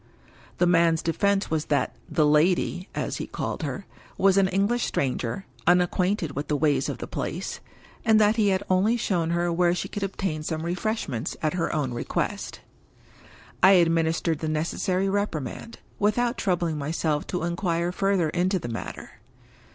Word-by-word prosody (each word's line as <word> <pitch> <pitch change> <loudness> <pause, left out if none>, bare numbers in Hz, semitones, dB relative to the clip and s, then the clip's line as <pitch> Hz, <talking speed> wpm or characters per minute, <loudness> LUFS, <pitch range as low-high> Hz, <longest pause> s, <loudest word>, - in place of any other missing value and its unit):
The 180 - +3
man's 165 -2 +3
defense 200 +4 +1
was 155 -1 0
that 135 -5 0
"the 155 - +2
lady" 175 +4 +2
(as - - -2
he - - -5
called - - -4
her) - - -4 0.3
was 195 -1 +4
an 195 -1 +4
English 200 +6 +1
stranger, 130 +4 -2 0.2
unacquainted 180 -1 +2
with 145 +2 -3
the 150 - 0
ways 145 0 +1
of - - -4
the - - -5
place, - - -4 0.4
and 220 -1 +5
that 210 +1 +4
he 215 -3 +2
had 190 0 +1
only 200 +6 +3
shown 175 -7 0
her 170 0 0
where 175 0 +3
she - - -3
could 205 - -6
obtain 190 -5 -2
some 155 +1 -3
refreshments 175 - -2
at 155 - +1
her 175 -2 -1
own 145 -6 -1
request. 120 - -3 1.0
I 190 +2 +8
administered 165 -2 +2
the 160 - -2
necessary 180 +4 0
reprimand, 200 - -3 0.2
without 235 +4 +1
troubling 170 -5 0
myself 150 +1 -1
to 180 - -3
inquire 170 0 -1
further 195 -3 +1
into 180 +4 +1
the 135 -9 -5
matter. 115 - -7
175 Hz, 160 wpm, -25 LUFS, 155-195 Hz, 1.0 s, I